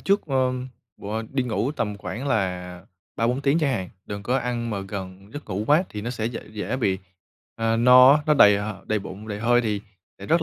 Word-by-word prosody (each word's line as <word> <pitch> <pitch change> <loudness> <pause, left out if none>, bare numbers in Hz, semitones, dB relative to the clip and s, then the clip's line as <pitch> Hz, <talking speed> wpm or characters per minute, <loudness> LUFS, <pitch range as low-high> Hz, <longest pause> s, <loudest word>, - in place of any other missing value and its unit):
trước, 200 -1 +1
ơm, 130 -2 0 0.3
b - - -16 0.3
đi 135 -1 +1
ngủ 120 +3 -1
tầm 110 -7 -3
khoảng 100 +10 -5
là 90 -5 -2 0.3
3-4 120 +3 +1
tiếng 140 +3 +2
chẳng 145 -5 +1
hạn, 95 -6 -3 0.2
đừng 100 0 -6
có 125 +4 0
ăn 120 -2 -3
mà 100 -2 -2
gần 95 0 -8
giấc 145 - -7
ngủ 100 +3 -2
quá 150 +6 +5
thì 105 - -6
nó 120 - -3
sẽ 110 -3 -4
dễ 115 0 -4
dễ 110 +3 -3
bị, 95 -7 0 0.6
ờ, 115 0 0
no 125 +3 +8
á, 150 0 +2
nó 150 - +4
đầy 105 -6 +7
h 105 +1 -3 0.2
đầy 110 0 +1
bụng, 100 +2 -9
đầy 105 -1 -4
hơi 120 +1 +4
thì 105 -3 -1 0.4
sẽ 100 - -9
rất 165 +6 +3
115 Hz, 225 wpm, -24 LUFS, 100-130 Hz, 0.6 s, no